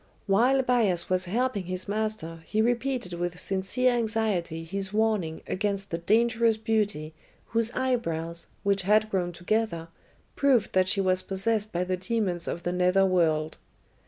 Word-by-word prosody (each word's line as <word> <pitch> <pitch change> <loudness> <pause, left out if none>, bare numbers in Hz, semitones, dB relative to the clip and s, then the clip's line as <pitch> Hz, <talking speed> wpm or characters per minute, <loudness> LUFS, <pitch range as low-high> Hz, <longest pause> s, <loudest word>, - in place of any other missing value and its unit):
While 245 +7 +3
Bias 220 -9 +1
was 185 0 +2
helping 215 0 -1
his 185 +2 -4
master 205 -6 -3
he 215 - -1
repeated 240 -3 0
with 175 +1 -3
sincere 195 +7 0
anxiety 215 -8 -1
his 195 +3 -4
warning 210 -7 0
against 200 0 -2
the 165 - -2
dangerous 230 +4 +2
beauty 210 -8 -1 0.4
whose 230 0 +1
eyebrows, 170 -11 -1 0.2
which 200 -1 +2
had 215 +3 +2
grown 180 -2 0
together, 175 -1 -2 0.5
proved 265 -6 +2
that 185 0 +3
she 195 +1 +2
was 185 -1 +2
possessed 210 +3 -1
by 175 +1 -1
the 185 0 -2
demons 185 -3 -2
of 170 - -4
the 175 - -1
nether 180 +2 +3
world. 160 -4 +1
195 Hz, 150 wpm, -27 LUFS, 175-225 Hz, 0.5 s, While